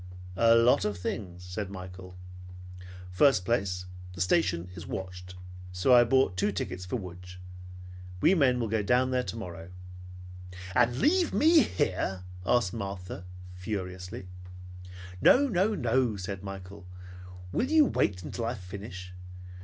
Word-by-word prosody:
"A 115 +3 +5
lot 115 +2 +4
of 105 -2 -2
things," 90 -1 -5
said 95 +2 -5
Michael. 90 -1 -9 0.9
"First 90 0 +4
place, 95 -5 -1 0.3
the 85 - -6
station 90 - +1
is 85 -2 -9
watched, 90 -1 -7 0.4
so 90 +8 +2
I 120 -1 +8
bought 130 -6 +2
two 105 +3 +1
tickets 90 -2 -4
for 95 - -2
Lodz. 90 -2 -9 0.8
We 175 - +5
men 130 -8 +3
will 115 - -1
go 110 0 0
down 125 +5 +2
there 130 0 +2
tomorrow." 95 -4 -7 1.0
"And 120 +4 +3
leave 345 - +2
me 320 +2 +6
here!" 90 - -1 0.2
asked 120 -7 +2
Martha 95 -3 -6 0.3
furiously. 90 -1 -6 1.0
"No, 285 +3 +6
no, 210 -1 +1
no!" 120 - +1
said 95 0 -5
Michael. 95 -1 -9 0.6
"Will 255 - 0
you 310 -1 +6
wait 90 - 0
until 115 +9 -4
I 120 +2 -2
finish? 95 -1 -9
100 Hz, 135 wpm, -29 LUFS, 90-120 Hz, 1.0 s, I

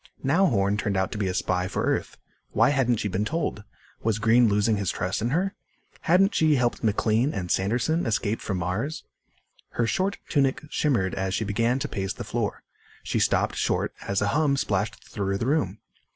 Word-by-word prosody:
Now 170 +8 +3
Horn 100 - +1
turned 100 -2 -1
out 95 0 0
to 105 - -5
be 100 - 0
a 90 - -1
spy 90 0 0
for 95 - -2
Earth. - - -1 0.4
Why 115 +4 +4
hadn't 130 -4 +2
she 105 - -2
been 100 +1 -1
told? 150 -5 -2 0.4
Was 110 -2 0
Green 115 +2 +4
losing 105 +1 +2
his 100 -3 -1
trust 95 +4 -2
in 115 - 0
her? 185 +8 0 0.5
Hadn't 195 +5 +3
she 155 -2 +3
helped 125 -2 0
McLean 110 +4 +1
and 90 -3 -3
Sanderson 120 - +1
escape 110 0 0
from 95 - -2
Mars? 95 - -3 0.7
Her 120 - +1
short 190 +11 0
tunic 135 -1 +1
shimmered 115 -11 +1
as 95 0 -1
she 110 - -1
began 115 +5 +1
to 140 +2 -2
pace 95 -6 -3
the - - -7
floor. - - -3 0.4
She - - -1
stopped - - +1
short - - 0
as 100 0 0
a 100 - +1
hum 145 +2 +2
splashed 100 -4 -2
through 100 -1 -2
the 115 - -2
room. 115 - 0
110 Hz, 195 wpm, -26 LUFS, 100-135 Hz, 0.7 s, Why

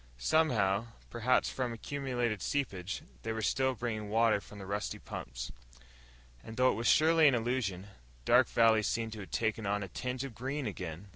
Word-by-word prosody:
Somehow, 115 - +2 0.2
perhaps 120 +2 +2
from 125 -2 -2
accumulated 120 -4 -2
seepage, 100 -10 -2 0.2
they 110 - -3
were 110 0 -3
still 130 +3 +1
bringing 110 -3 -3
water 110 -1 +3
from 105 - -13
the 100 - -8
rusty 100 +2 -3
pumps. - - -7 0.9
And 110 - -9
though 130 0 +5
it - - -2
was 115 - -1
surely 160 0 +6
an 135 - +5
illusion 115 -6 -1 0.4
Dark - - +5
Valley 115 -1 +4
seemed 110 +1 -1
to 110 - -8
have 95 - -8
taken 110 -2 -1
on 100 0 0
a - - -5
tinge 125 +7 -4
of 135 -3 -6
green 135 +5 -3
again. 95 -2 -6
115 Hz, 180 wpm, -32 LUFS, 100-130 Hz, 0.9 s, surely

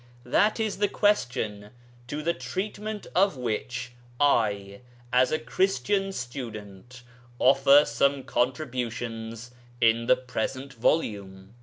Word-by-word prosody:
That 215 +2 +2
is 215 -3 -1
the 205 - +3
question 120 - 0 0.4
to 150 +4 -4
the 170 +2 +1
treatment 210 +4 -5
of 185 -5 +3
which 120 +1 -3 0.3
I 100 -8 +1 0.3
(as 125 +1 +4
a 155 - +2
Christian 195 +3 0
student) 120 - -8 0.3
offer 135 +3 +6
some 135 +4 +1
contributions 120 -3 -3 0.3
in 115 0 +3
the 130 - +6
present 130 +2 -4
volume. 100 -7 -1
125 Hz, 110 wpm, -27 LUFS, 115-155 Hz, 0.4 s, offer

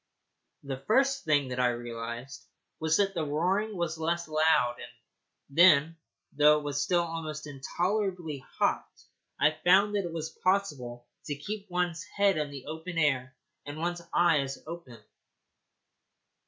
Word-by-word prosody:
The 135 -2 -4
first 270 +4 +2
thing 145 -4 +2
that 125 0 -4
I 125 - +4
realized 120 +2 -5 0.3
was 160 0 +2
that 195 -1 +2
the 165 -4 -1
roaring 185 +8 0
was 165 -2 -2
less 170 +1 -1
loud, 155 -6 +2
and - - -9 0.6
then, 165 -2 +6 0.4
though 150 +1 +6
it 150 - -5
was 145 -1 -2
still 175 -1 +2
almost 160 -2 -5
intolerably 175 +3 -2 0.2
hot, - - +2 0.6
I 150 - +5
found 195 +4 +5
that 200 -2 0
it 170 - -4
was 160 -1 -5
possible 145 -11 0 0.2
to 145 - -3
keep 200 +7 -6
one's 175 -2 -1
head 200 +2 +1
in 150 -1 -2
the 140 -2 -9
open 160 +3 -6
air 135 -4 +1 0.3
and 145 +1 -7
one's 175 +2 -2
eyes 145 -6 +2
open. 160 -7 -9
160 Hz, 145 wpm, -29 LUFS, 140-180 Hz, 0.6 s, then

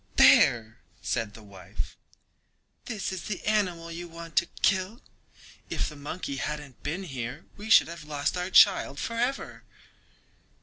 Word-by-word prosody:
"There!" 110 -2 +5 0.2
said 105 -2 -2
the 110 - -12
wife. 95 -3 -8 0.9
"This 215 -6 -3
is 190 -2 -5
the 195 -4 -4
animal 180 -6 0
you 175 +1 -6
want 165 -1 -10
to 170 - +4 0.2
kill—if 190 +4 -3
the 150 - -11
monkey 145 0 -5
hadn't 150 -2 -5
been 175 +6 -3
here 135 -3 -6
we 210 +2 -8
should - - +7
have 170 -1 -8
lost 145 +1 -1
our 180 +1 -2
child 185 -7 +5
forever." 240 - -2
170 Hz, 135 wpm, -28 LUFS, 140-190 Hz, 0.9 s, should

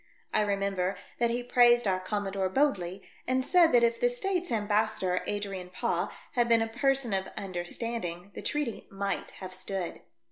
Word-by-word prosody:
I 215 - +3
remember 195 -2 0 0.2
that 235 -1 +3
he 240 +1 -1
praised 240 -1 +5
our 185 -1 +2
Commodore 195 0 -2
Bodley, 190 -7 0 0.2
and 255 +1 +1
said 345 -1 +5
that 240 -1 +5
if 230 0 +2
the 245 - +3
States' 360 +8 -1
ambas 215 0 +2
sador, 180 -1 0
Adrian 195 -3 -3
Paaw, 180 - -1 0.2
had 240 -3 +1
been 230 -1 +5
a - - -2
person 250 0 +2
of 190 0 0
understanding, 185 0 -4
the - - -7
treaty 295 -7 -2
might 195 0 -3 0.2
have 185 - -7
stood. 185 -1 -4
210 Hz, 170 wpm, -29 LUFS, 190-240 Hz, 0.2 s, praised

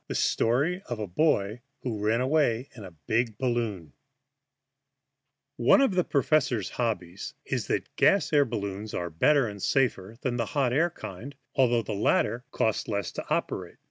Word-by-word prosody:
IV - - -49
THE - - -4
STORY 145 +11 +1
OF 120 - -3
A 105 - -3
BOY 105 - +1 0.2
WHO 115 -5 -3
RAN 110 +3 +2
AWAY 130 -3 +1
IN 110 - -9
A 95 - -8 0.2
BIG 115 -1 0
BALLOON 115 - -2 1.6
ONE 120 - +5
of 270 -8 +3
the 180 -1 +2
professor's 135 - +1
hobbies 100 -7 -3
is - - -2
that - - -2
gas 195 -6 +4
balloons 110 -8 0
are 85 -1 -3
better 135 - +3
and 100 -2 -7
safer 115 -5 0
than 120 -2 -1
the 115 -2 -1
hot 130 -3 +2
air 165 +6 +3
kind, 125 - -9 0.2
although 120 -4 +3
the 110 - -4
latter 110 +3 +1
cost 110 - 0
less 100 -2 -2
to - - -7
operate. - - -2
120 Hz, 165 wpm, -27 LUFS, 105-135 Hz, 1.6 s, ONE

